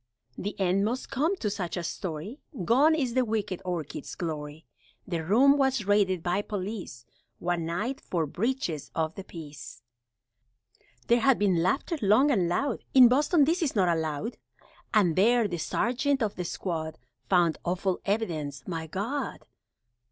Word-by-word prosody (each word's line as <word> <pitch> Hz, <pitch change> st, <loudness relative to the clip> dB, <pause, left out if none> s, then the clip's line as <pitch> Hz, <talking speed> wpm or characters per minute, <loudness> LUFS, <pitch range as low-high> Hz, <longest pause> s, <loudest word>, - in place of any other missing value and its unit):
The 205 Hz, +1 st, -5 dB
end 190 Hz, +1 st, +2 dB
must 240 Hz, +5 st, -2 dB
come 315 Hz, +9 st, +1 dB
to 225 Hz, -, -2 dB
such 185 Hz, -3 st, -3 dB
a 175 Hz, -, -3 dB
story, 180 Hz, -, -5 dB, 0.3 s
Gone 285 Hz, -, +5 dB
is 260 Hz, -6 st, -1 dB
the 255 Hz, 0 st, +3 dB
wicked 215 Hz, -5 st, -2 dB
Orchids' 175 Hz, -5 st, -5 dB
glory, 155 Hz, -2 st, -5 dB, 0.4 s
The 170 Hz, -4 st, -2 dB
room 265 Hz, -, +5 dB
was 265 Hz, -5 st, +1 dB
raided 195 Hz, -4 st, +2 dB
by 180 Hz, +3 st, +1 dB
police, 195 Hz, -, -5 dB, 0.3 s
One 175 Hz, -2 st, -1 dB
night, 215 Hz, +11 st, -2 dB
for 170 Hz, -3 st, -1 dB
breaches 180 Hz, -, -2 dB
of 160 Hz, 0 st, 0 dB
the 195 Hz, -, -8 dB
Peace 150 Hz, -8 st, -10 dB, 1.2 s
(There 235 Hz, +1 st, +4 dB
had 260 Hz, +2 st, +4 dB
been 190 Hz, -5 st, +2 dB
laughter, 280 Hz, -, 0 dB
long 235 Hz, +9 st, +4 dB
and 185 Hz, -9 st, +2 dB
loud, 265 Hz, +8 st, -1 dB
In 255 Hz, -2 st, +9 dB
Boston 295 Hz, +5 st, +4 dB
this 335 Hz, +5 st, +1 dB
is 295 Hz, -7 st, 0 dB
not 180 Hz, -4 st, +3 dB
allowed), 160 Hz, +8 st, -3 dB, 0.5 s
And 195 Hz, -8 st, +3 dB
there, 230 Hz, +3 st, +4 dB
the 175 Hz, -3 st, -4 dB
sergeant 255 Hz, -, 0 dB
of 210 Hz, -2 st, -1 dB
the 180 Hz, -, -5 dB
squad 160 Hz, -3 st, -4 dB, 0.3 s
Found 175 Hz, -4 st, +3 dB
awful 185 Hz, +1 st, -1 dB
evidence 160 Hz, -10 st, -2 dB
my 165 Hz, -3 st, -4 dB
God! 230 Hz, -, -4 dB
195 Hz, 155 wpm, -28 LUFS, 170-245 Hz, 1.2 s, In